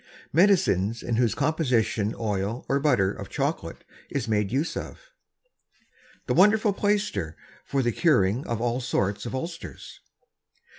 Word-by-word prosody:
MEDICINES 125 Hz, -, +3 dB
In 115 Hz, -2 st, -1 dB
whose 120 Hz, -2 st, +2 dB
Composition 125 Hz, -8 st, 0 dB
OIL 105 Hz, +1 st, -2 dB
or 140 Hz, -, +1 dB
BUTTER 105 Hz, -10 st, +2 dB
OF -, -, -8 dB
CHOCOLATE -, -, -3 dB, 0.3 s
Is 115 Hz, -, -3 dB
made 105 Hz, -2 st, 0 dB
use 140 Hz, +6 st, -1 dB
of. -, -, -8 dB, 1.2 s
_The -, -, +1 dB
Wonderful 210 Hz, +1 st, +5 dB
Plaister 195 Hz, -, -1 dB, 0.3 s
for 135 Hz, -1 st, -1 dB
the 120 Hz, -, +1 dB
Curing 120 Hz, -, +2 dB
of 115 Hz, -2 st, -2 dB
all 120 Hz, +2 st, -1 dB
sorts 105 Hz, -3 st, -1 dB
of 125 Hz, -, -4 dB
Ulcers. 165 Hz, +5 st, -7 dB
120 Hz, 135 wpm, -26 LUFS, 105-160 Hz, 1.2 s, Wonderful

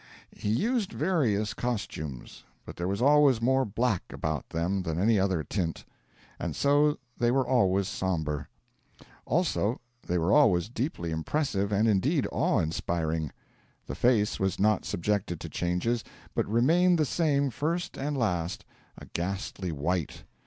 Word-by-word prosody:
He 105 Hz, -, -3 dB
used 215 Hz, -, 0 dB
various 115 Hz, -, +1 dB
costumes: 80 Hz, -, -5 dB, 0.2 s
but -, -, -9 dB
there 85 Hz, -, -3 dB
was 100 Hz, +5 st, -1 dB
always 145 Hz, -3 st, +5 dB
more 130 Hz, +3 st, +2 dB
black 110 Hz, -1 st, 0 dB
about 80 Hz, -1 st, -3 dB
them 90 Hz, +4 st, -1 dB
than 80 Hz, -3 st, -3 dB
any 110 Hz, +2 st, +3 dB
other 95 Hz, -4 st, +1 dB
tint; 85 Hz, -3 st, -3 dB, 0.5 s
and -, -, -3 dB
so 145 Hz, +1 st, +3 dB, 0.2 s
they 120 Hz, -, +3 dB
were 130 Hz, +1 st, +2 dB
always 100 Hz, -7 st, +2 dB
sombre. 80 Hz, -7 st, -2 dB, 0.8 s
Also 145 Hz, -, +1 dB, 0.3 s
they 90 Hz, -, +1 dB
were 85 Hz, +3 st, +2 dB
always 105 Hz, -, +4 dB
deeply 115 Hz, -, -3 dB
impressive 100 Hz, -, -1 dB
and, 105 Hz, +2 st, +3 dB
indeed, 100 Hz, -4 st, +2 dB
awe -, -, +1 dB
inspiring. 80 Hz, -1 st, -1 dB, 0.5 s
The -, -, -5 dB
face 115 Hz, -4 st, +2 dB
was 95 Hz, -1 st, 0 dB
not 105 Hz, +2 st, +2 dB
subjected 90 Hz, -2 st, -1 dB
to 85 Hz, -, -7 dB
changes, 90 Hz, +9 st, -1 dB, 0.3 s
but -, -, 0 dB
remained 165 Hz, -, +4 dB
the 155 Hz, -, +2 dB
same 140 Hz, -3 st, +1 dB
first 170 Hz, +8 st, -2 dB
and 145 Hz, +1 st, -2 dB
last 90 Hz, -8 st, -1 dB, 0.3 s
a -, -, -10 dB
ghastly 95 Hz, 0 st, -4 dB
white. 80 Hz, +2 st, -2 dB
105 Hz, 145 wpm, -28 LUFS, 90-135 Hz, 0.8 s, always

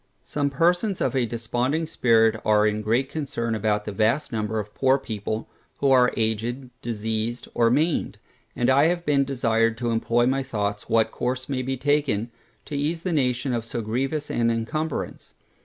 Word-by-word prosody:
Some 145 Hz, -1 st, -1 dB
persons 175 Hz, -, +1 dB
of -, -, 0 dB
a 125 Hz, -3 st, +2 dB
desponding 120 Hz, +7 st, -1 dB
spirit 115 Hz, -6 st, +3 dB
are 105 Hz, 0 st, +4 dB
in 105 Hz, 0 st, 0 dB
great 115 Hz, +5 st, +1 dB
concern 130 Hz, -6 st, -3 dB
about 105 Hz, -1 st, 0 dB
that 105 Hz, -, -3 dB
vast 115 Hz, +10 st, +1 dB
number 110 Hz, -1 st, -2 dB
of 105 Hz, 0 st, -6 dB
poor 135 Hz, 0 st, +3 dB
people, 110 Hz, -3 st, -4 dB, 0.3 s
who 140 Hz, -1 st, +2 dB
are 125 Hz, -2 st, +5 dB
aged, 115 Hz, +4 st, -2 dB
diseased, 110 Hz, +1 st, -3 dB
or 115 Hz, -1 st, +3 dB
maimed; 150 Hz, +6 st, +1 dB, 0.4 s
and 120 Hz, -, +1 dB
I 140 Hz, +3 st, +5 dB
have 175 Hz, +1 st, 0 dB
been 140 Hz, -2 st, +3 dB
desired 115 Hz, -4 st, +1 dB
to 120 Hz, -1 st, -1 dB
employ 115 Hz, +1 st, +2 dB
my 135 Hz, +2 st, +1 dB
thoughts 105 Hz, -6 st, -3 dB
what 115 Hz, -1 st, +3 dB
course 130 Hz, +1 st, -2 dB
may 135 Hz, -2 st, -2 dB
be 130 Hz, +1 st, -2 dB
taken, 140 Hz, -5 st, 0 dB, 0.3 s
to 150 Hz, -, -6 dB
ease 155 Hz, +4 st, -1 dB
the 180 Hz, -, -1 dB
nation 130 Hz, -2 st, 0 dB
of 115 Hz, -2 st, -1 dB
so 115 Hz, 0 st, -4 dB
grievous 135 Hz, +7 st, -2 dB
an 115 Hz, 0 st, +1 dB
incumbrance. 130 Hz, +7 st, -3 dB
120 Hz, 175 wpm, -24 LUFS, 110-140 Hz, 0.4 s, are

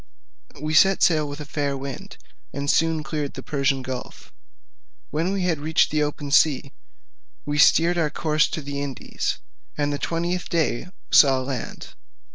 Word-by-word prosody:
We 155 Hz, +2 st, -3 dB
set 190 Hz, +5 st, +5 dB
sail 155 Hz, -3 st, +3 dB
with 145 Hz, +1 st, -7 dB
a -, -, -6 dB
fair 145 Hz, -1 st, -2 dB
wind, 135 Hz, -1 st, -8 dB, 0.4 s
and 140 Hz, +1 st, 0 dB
soon 165 Hz, -1 st, +1 dB
cleared 150 Hz, -3 st, -4 dB
the 130 Hz, -, -7 dB
Persian 140 Hz, -2 st, 0 dB
gulf; 130 Hz, -1 st, -7 dB, 0.8 s
when 165 Hz, +5 st, 0 dB
we 195 Hz, -1 st, -1 dB
had 170 Hz, -4 st, 0 dB
reached 155 Hz, +2 st, +2 dB
the 155 Hz, 0 st, +1 dB
open 145 Hz, -1 st, -3 dB
sea, 140 Hz, -2 st, +3 dB, 0.7 s
we 145 Hz, 0 st, -2 dB
steered 170 Hz, +4 st, +5 dB
our 155 Hz, -2 st, +1 dB
course 155 Hz, 0 st, +1 dB
to 155 Hz, -, -5 dB
the 140 Hz, 0 st, -4 dB
Indies; 140 Hz, -3 st, -3 dB, 0.4 s
and 145 Hz, -1 st, 0 dB
the 145 Hz, -, -3 dB
twentieth 170 Hz, +2 st, -2 dB
day 160 Hz, -4 st, 0 dB, 0.2 s
saw 135 Hz, -3 st, +6 dB
land. 130 Hz, -2 st, -6 dB
150 Hz, 160 wpm, -23 LUFS, 140-160 Hz, 0.8 s, saw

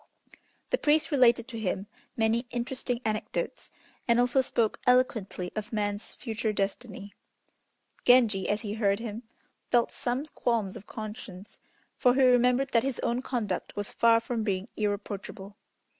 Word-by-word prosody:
The -, -, +2 dB
priest 305 Hz, +2 st, +2 dB
related 240 Hz, -4 st, +4 dB
to 230 Hz, -3 st, -6 dB
him 195 Hz, -2 st, -2 dB, 0.3 s
many 230 Hz, +2 st, +1 dB
interesting 245 Hz, 0 st, -3 dB
anecdotes, 225 Hz, -, -3 dB, 0.4 s
and 235 Hz, 0 st, +4 dB
also 245 Hz, +2 st, +3 dB
spoke 230 Hz, -4 st, 0 dB
eloquently 225 Hz, -8 st, +2 dB
of 215 Hz, 0 st, -4 dB
man's 205 Hz, -1 st, -2 dB
future 220 Hz, -2 st, -2 dB
destiny. 200 Hz, 0 st, -4 dB, 0.9 s
Genji 230 Hz, -6 st, +4 dB
as 210 Hz, +1 st, 0 dB
he 210 Hz, -3 st, -4 dB
heard 200 Hz, -2 st, +2 dB
him, 225 Hz, 0 st, -5 dB, 0.5 s
felt 240 Hz, -1 st, +3 dB
some 250 Hz, +4 st, -2 dB
qualms 230 Hz, -9 st, -1 dB
of 200 Hz, -, -10 dB
conscience, 215 Hz, -3 st, -8 dB, 0.4 s
for 250 Hz, 0 st, +4 dB
he 270 Hz, -, +4 dB
remembered 250 Hz, +1 st, +4 dB
that 230 Hz, -, +4 dB
his 265 Hz, 0 st, -3 dB
own 240 Hz, +2 st, 0 dB
conduct 225 Hz, -8 st, -3 dB
was 205 Hz, 0 st, -3 dB
far 230 Hz, -1 st, +4 dB
from 230 Hz, 0 st, -3 dB
being 200 Hz, 0 st, -2 dB
irreproachable. 205 Hz, -1 st, -4 dB
230 Hz, 145 wpm, -28 LUFS, 205-245 Hz, 0.9 s, related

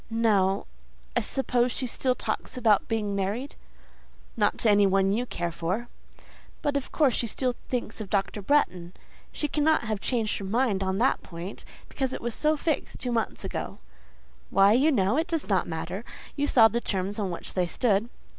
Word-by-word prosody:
"No… 205 Hz, -4 st, +2 dB, 0.5 s
I -, -, +4 dB
suppose 250 Hz, -2 st, 0 dB
she 260 Hz, -, -2 dB
still 255 Hz, +1 st, 0 dB
talks 255 Hz, -, -4 dB
about 220 Hz, -4 st, +3 dB
being 210 Hz, -3 st, -1 dB
married?" 205 Hz, +8 st, -2 dB, 0.8 s
"Not 210 Hz, -2 st, +2 dB
to 225 Hz, -, +3 dB
any 205 Hz, -1 st, +5 dB
one 195 Hz, 0 st, +3 dB
you 240 Hz, +5 st, 0 dB
care 175 Hz, -5 st, -3 dB
for." 185 Hz, +9 st, -3 dB, 0.7 s
"But 290 Hz, -2 st, 0 dB
of 280 Hz, -, -2 dB
course 285 Hz, -6 st, +3 dB
she 235 Hz, -, 0 dB
still 250 Hz, +2 st, 0 dB, 0.2 s
thinks 235 Hz, -3 st, -3 dB
of 205 Hz, -, -6 dB
Dr. 195 Hz, 0 st, -1 dB
Bretton? 185 Hz, -8 st, +1 dB, 0.4 s
She 300 Hz, -, -1 dB
cannot 300 Hz, +1 st, +2 dB
have 215 Hz, -2 st, -2 dB
changed 225 Hz, -4 st, 0 dB
her 200 Hz, -, -5 dB
mind 215 Hz, -1 st, +1 dB
on 190 Hz, 0 st, 0 dB
that 245 Hz, +5 st, +2 dB
point, 175 Hz, +3 st, -8 dB, 0.2 s
because 265 Hz, -2 st, -2 dB
it -, -, -5 dB
was 235 Hz, 0 st, -2 dB
so 305 Hz, +4 st, +1 dB
fixed 310 Hz, 0 st, -2 dB
two 250 Hz, -, -3 dB
months 225 Hz, -3 st, -2 dB
ago." -, -, -4 dB, 0.7 s
"Why, 195 Hz, +2 st, +5 dB
you 280 Hz, +7 st, +4 dB
know, 210 Hz, -1 st, +2 dB
it 325 Hz, +2 st, +1 dB
does 330 Hz, -3 st, -2 dB
not 190 Hz, -4 st, +1 dB
matter. 175 Hz, +5 st, -4 dB, 0.3 s
You 285 Hz, 0 st, 0 dB
saw 225 Hz, -5 st, +7 dB
the 235 Hz, +2 st, -2 dB
terms 195 Hz, 0 st, -2 dB
on 200 Hz, -3 st, -1 dB
which 170 Hz, -, -6 dB
they 180 Hz, -2 st, +1 dB
stood." 215 Hz, +3 st, +1 dB
220 Hz, 185 wpm, -27 LUFS, 195-255 Hz, 0.8 s, saw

